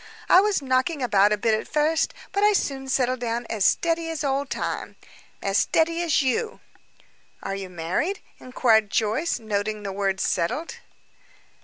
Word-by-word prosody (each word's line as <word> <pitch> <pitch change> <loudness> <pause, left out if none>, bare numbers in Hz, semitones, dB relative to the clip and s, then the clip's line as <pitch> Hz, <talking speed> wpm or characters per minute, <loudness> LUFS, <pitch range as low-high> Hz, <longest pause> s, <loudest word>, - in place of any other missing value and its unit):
I 365 - +7
was 405 -7 0
knocking 260 +3 0
about 205 -3 +4
a 210 - +2
bit 220 +2 +1
at 215 - -1
first, 310 +2 +1 0.2
but 400 - -1
I 420 0 +5
soon 270 -8 -2
settled 255 -1 +1
down 235 0 -2
as 215 -3 -1
steady 330 - +1
as 325 -2 -4
Old 275 0 -1
Time - - -4 0.5
as 195 0 +2
steady 330 +1 +1
as 330 -4 +2
you." 445 - -1 0.8
"Are 195 - -3
you 195 -1 -5
married?" 180 - -2 0.2
inquired 225 -4 +2
Joyce, 225 +12 0
noting 215 -1 -3
the 200 - -4
word 195 -1 -1
"settled." 285 - -1
255 Hz, 160 wpm, -24 LUFS, 210-325 Hz, 0.8 s, I